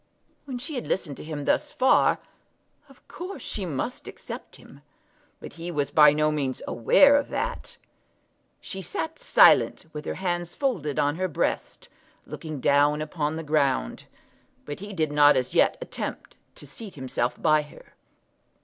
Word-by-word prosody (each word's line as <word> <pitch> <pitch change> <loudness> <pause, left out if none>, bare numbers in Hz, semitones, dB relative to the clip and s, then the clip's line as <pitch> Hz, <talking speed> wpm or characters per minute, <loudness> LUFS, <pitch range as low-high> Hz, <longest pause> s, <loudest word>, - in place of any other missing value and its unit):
When 265 -3 -5
she 280 +6 -5
had 250 - -4
listened 150 -7 -2
to - - -9
him 150 -2 -6
thus - - +1
far, 260 0 +3 0.7
of - - -21
course 370 +3 -8
she 195 -4 -4
must 155 - -4
accept - - -9
him; - - -16 0.6
but - - -10
he 170 +1 -7
was 145 -4 -2
by 150 -1 +7
no 150 +1 +1
means 140 -4 -2
aware 280 - +5
of 285 - -2
that. - - -4 0.8
She 190 - -7
sat 320 - -4
silent, - - +5
with 150 0 -7
her - - -3
hands 175 -2 -3
folded 180 - -2
on 145 +2 +1
her 185 +1 0
breast, 165 - -3 0.4
looking 155 -3 -7
down 145 +3 +3
upon 155 0 -2
the 165 - -5
ground; 140 - 0 0.6
but 145 - -6
he 205 +2 -8
did 160 -6 -1
not 145 0 +6
as 125 - -2
yet - - +3
attempt - - -6 0.2
to - - -12
seat 195 - -10
himself 130 -3 -2
by 155 0 +3
her. 150 - -15
155 Hz, 160 wpm, -25 LUFS, 145-190 Hz, 0.8 s, by